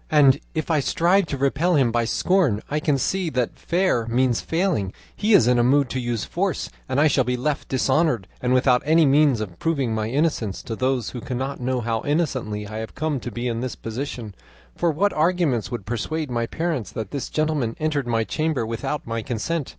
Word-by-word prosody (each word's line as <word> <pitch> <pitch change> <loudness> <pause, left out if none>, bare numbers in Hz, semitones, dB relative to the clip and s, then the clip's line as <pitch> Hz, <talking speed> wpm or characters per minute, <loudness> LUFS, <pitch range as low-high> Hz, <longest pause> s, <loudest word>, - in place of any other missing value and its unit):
And 140 -3 +5 0.2
if 160 +1 -1
I 155 - +3
strive 175 +6 +2
to 140 - -3
repel 145 +6 +2
him 130 -5 +3
by 120 0 +1
scorn, 155 - +1
I 150 - +1
can 150 -2 +1
see 185 +5 0
that, 125 -4 -1
fair 170 -10 0
means 120 0 +1
failing, 165 - 0 0.2
he 215 0 +3
is 120 - +6
in 125 -1 +4
a - - +4
mood 135 +1 +3
to 130 - -1
use 120 -3 -2
force, 185 -2 -2 0.2
and 130 +1 +1
I 150 - +5
shall 140 -3 +3
be 125 +1 -1
left 140 +4 -2
dishonoured 130 - +1
and 125 - 0
without 125 -1 +4
any 160 +2 +4
means 140 -4 +4
of 90 -5 -6
proving 140 -8 0
my 110 0 -1
innocence 130 -7 -1
to 115 - -4
those 130 -1 0
who 125 - -6
cannot 130 +2 -4
know 125 0 0
how 115 -1 -1
innocently 130 -9 -1
I 110 +2 -5
have 110 - -7
come 155 -2 -1
to 120 - -6
be 120 +2 -4
in 115 -1 -2
this 130 -1 -3
position; 115 -2 -5 0.4
for 170 - +1
what 195 +7 +1
arguments 155 - +1
would 120 -5 -5
persuade 135 +7 -3
my 115 -1 -1
parents 160 - -2
that 110 -3 -5
this 140 - -4
gentleman 155 -7 0
entered 150 -4 -1
my 115 -1 +1
chamber 155 -1 -1
without 135 +6 -3
my 115 0 -3
consent? 130 +7 -2
130 Hz, 210 wpm, -23 LUFS, 115-155 Hz, 0.4 s, is